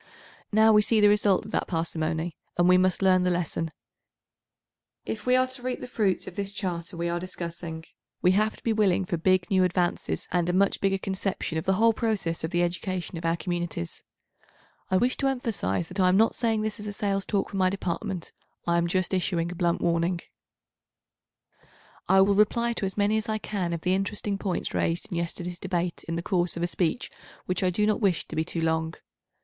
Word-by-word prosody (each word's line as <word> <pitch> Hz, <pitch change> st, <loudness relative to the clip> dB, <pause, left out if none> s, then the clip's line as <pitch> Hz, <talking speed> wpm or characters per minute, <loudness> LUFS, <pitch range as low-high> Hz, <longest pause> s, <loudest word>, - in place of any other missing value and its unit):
Now 220 Hz, +1 st, +6 dB
we 210 Hz, -, +7 dB
see 220 Hz, +1 st, +3 dB
the 205 Hz, -1 st, +6 dB
result 205 Hz, -2 st, +3 dB
of 215 Hz, -, -9 dB
that -, -, -1 dB
parsimony, 165 Hz, 0 st, -2 dB, 0.2 s
and 175 Hz, 0 st, +4 dB
we 180 Hz, -, +7 dB
must 185 Hz, +1 st, +2 dB
learn 185 Hz, -1 st, +5 dB
the 180 Hz, -, +2 dB
lesson. 170 Hz, -2 st, -1 dB, 1.4 s
If 215 Hz, +1 st, -5 dB
we 250 Hz, -, +5 dB
are 255 Hz, 0 st, +4 dB
to 255 Hz, 0 st, -7 dB
reap 250 Hz, 0 st, -3 dB
the -, -, -6 dB
fruits 215 Hz, -6 st, 0 dB
of 180 Hz, -, -9 dB
this 200 Hz, 0 st, -2 dB
Charter 175 Hz, -3 st, -4 dB
we 170 Hz, 0 st, -1 dB
are 170 Hz, 0 st, -1 dB
discussing 170 Hz, -2 st, -6 dB, 0.3 s
we 180 Hz, -, +4 dB
have 215 Hz, +3 st, +1 dB
to -, -, -20 dB
be 230 Hz, -, +1 dB
willing 195 Hz, -3 st, +2 dB
for 175 Hz, -, -2 dB
big 185 Hz, +2 st, +2 dB
new 190 Hz, -1 st, +4 dB
advances 180 Hz, -1 st, 0 dB
and 175 Hz, -1 st, +1 dB
a -, -, +1 dB
much 195 Hz, +2 st, +2 dB
bigger 195 Hz, 0 st, +2 dB
conception 190 Hz, -4 st, -2 dB
of -, -, -7 dB
the 190 Hz, -, +3 dB
862 215 Hz, +4 st, +3 dB
whole 230 Hz, -, +6 dB
process 210 Hz, -8 st, -1 dB
of 160 Hz, -, -1 dB
the 175 Hz, 0 st, +1 dB
education 175 Hz, +1 st, -3 dB
of 165 Hz, -, -7 dB
our 165 Hz, +1 st, +1 dB
communities. 175 Hz, -, -4 dB, 0.9 s
I 185 Hz, -, +3 dB
wish 245 Hz, +5 st, +1 dB
to 275 Hz, -, +1 dB
emphasise 220 Hz, -, -1 dB
that 190 Hz, -, -6 dB
I 185 Hz, -1 st, +5 dB
am 185 Hz, -, +4 dB
not 225 Hz, +2 st, +4 dB
saying 225 Hz, -3 st, 0 dB
this 215 Hz, 0 st, -3 dB
as 210 Hz, -, -6 dB
a 205 Hz, -, -4 dB
sales 200 Hz, -1 st, -1 dB
talk 200 Hz, -2 st, 0 dB
for 200 Hz, -, -4 dB
my 185 Hz, -1 st, +4 dB
Department. 190 Hz, -1 st, -3 dB, 0.3 s
I 170 Hz, 0 st, +2 dB
am 170 Hz, -, +1 dB
just 185 Hz, +2 st, 0 dB
issuing 175 Hz, -2 st, 0 dB
a -, -, -6 dB
blunt 170 Hz, 0 st, 0 dB
warning, 170 Hz, +1 st, +1 dB, 1.9 s
I 190 Hz, +1 st, +6 dB
will 200 Hz, +1 st, +4 dB
reply 235 Hz, +3 st, +2 dB
to 200 Hz, -, -2 dB
as 190 Hz, -, -6 dB
many 205 Hz, +1 st, +2 dB
as 220 Hz, +1 st, -3 dB
I 215 Hz, -, +1 dB
can 195 Hz, -5 st, -3 dB
of 170 Hz, -1 st, -3 dB
the 180 Hz, +2 st, +1 dB
interesting 195 Hz, +1 st, -2 dB
points 190 Hz, -3 st, -2 dB
raised 165 Hz, +1 st, -1 dB
in 175 Hz, -, -2 dB
yesterday's 175 Hz, +1 st, -4 dB
Debate 180 Hz, -2 st, -2 dB
in 165 Hz, -, -2 dB
the 170 Hz, -, -3 dB
course 175 Hz, -3 st, 0 dB
of 170 Hz, -, -2 dB
a -, -, +2 dB
speech 175 Hz, +6 st, -1 dB, 0.3 s
which 180 Hz, 0 st, -1 dB
I 185 Hz, -, +3 dB
do 210 Hz, +4 st, +1 dB
not 215 Hz, +2 st, +1 dB
wish 190 Hz, -6 st, +1 dB
to -, -, -7 dB
be 160 Hz, -, +1 dB
too 165 Hz, 0 st, -3 dB
long. 160 Hz, 0 st, 0 dB
185 Hz, 220 wpm, -27 LUFS, 170-205 Hz, 1.9 s, we